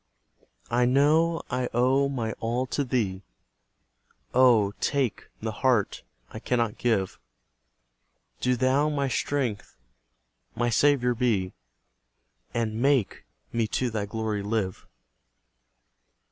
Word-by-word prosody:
I 120 +1 +3
know 155 +6 +3
I 125 0 -1
owe 130 +3 +3
my 120 -5 -2
all 120 +3 -1
to 145 +3 -1
Thee; 110 -8 -1 1.1
Oh, 120 -6 +5
TAKE 135 -6 -1
the 110 0 -2
heart 110 -1 +1 0.3
I 110 - -7
cannot 115 -2 -1
give! 105 -6 0 1.2
Do 125 0 +1
Thou 130 +4 +2
my 140 -2 -1
strength 130 -5 -2 0.8
my 120 0 0
Saviour 125 -1 +3
be, 110 -7 0 1.0
And 115 -1 -2
MAKE 135 -5 +1 0.3
me 115 -1 +1
to 125 +3 -1
Thy 105 -2 -2
glory 110 -1 -2
live. 100 -2 -3
120 Hz, 105 wpm, -26 LUFS, 110-130 Hz, 1.2 s, Oh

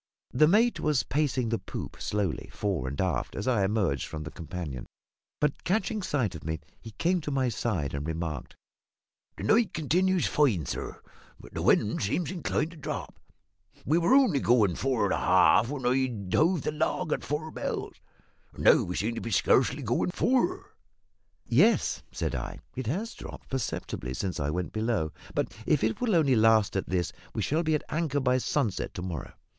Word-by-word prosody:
The 150 +5 +5
mate 225 +7 +3
was 150 -6 +1
pacing 130 -4 0
the 115 - 0
poop - - -7
slowly, 100 -5 -2
fore 95 -10 -2
and 70 +2 -5
aft, 85 -10 -1
as 100 - -4
I 120 -6 +3
emerged 95 -8 0
from 75 -1 -6
the 75 - -7
companion; 80 -7 -6 0.5
but, 150 -1 0
catching 215 +3 0
sight 130 - 0
of 80 - -9
me, 80 0 -3 0.2
he 115 - -9
came 175 - +1
to 150 - -4
my 135 -3 +1
side 95 - -2
and 70 +2 -3
remarked 80 -4 -4 0.8
"The - - -6
night 225 -1 +3
continues 180 +4 +2
fine, 115 - +2
sir, - - -5 0.4
but - - -14
the - - -3
wind 105 - +3
seems 145 - -1
inclined 170 -2 -1
to 170 - -13
drop. 150 - -5 0.7
We 160 +4 +3
were 175 +9 +4
only 245 - +5
going 110 -7 +3
four 125 0 0
and 100 - +1
half 115 - +4
when 140 -3 -4
I 125 -7 0
hove 165 0 +3
the - - -1
log 155 +2 -1
at - - -3
four 155 +2 -3
bells, - - -4 0.6
and - - -7
now - - +7
we 90 - -4
seem 110 +3 -1
to - - -5
be 115 - -4
scarcely 135 +6 +3
going 120 +8 0
four." 265 - 0 0.7
"Yes," - - +3
said - - -2
I, - - -4 0.2
"it 130 -3 -4
has 200 - -2
dropped - - -10
perceptibly 65 - -3
since 95 +4 -3
I 70 0 -1
went 90 +3 -3
below; 110 -8 0 0.2
but - - -1
if 150 -6 +3
it 110 0 0
will 230 -6 +2
only 145 -6 +4
last 110 -2 +4
at 95 - -2
this 90 -2 -1 0.2
we - - 0
shall 155 +3 +1
be 160 -2 +1
at 150 - -2
anchor 155 -3 0
by 130 -1 +2
sunset 105 -5 -1
to 90 - -4
morrow." 80 -9 -5
125 Hz, 185 wpm, -28 LUFS, 95-155 Hz, 0.8 s, now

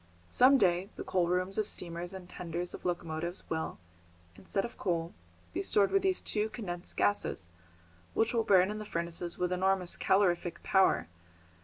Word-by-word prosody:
Some 265 +2 +6
day 185 -2 +2
the - - -5
coal 180 -2 +1
rooms 185 +3 0
of 215 - 0
steamers 175 0 -2
and 190 -2 -9
the - - -16
tenders 175 0 -4
of - - -9
locomotives 170 0 -3
will, 160 0 -2 0.6
instead 195 - -2
of 235 - -8
coal, 170 -3 -2 0.4
be - - -1
stored 200 0 +3
with 390 - +3
these 380 0 +1
two 215 0 -1
condensed 180 -6 -6
gases, 205 - +1 0.7
which 225 +2 +2
will 230 - +3
burn 190 -1 +4
in 215 - -5
the - - -5
furnaces 170 -1 -3
with 180 0 -1
enormous 185 -1 +1
calorific 180 -3 +1
power. 190 -1 +3
180 Hz, 170 wpm, -31 LUFS, 175-205 Hz, 0.7 s, Some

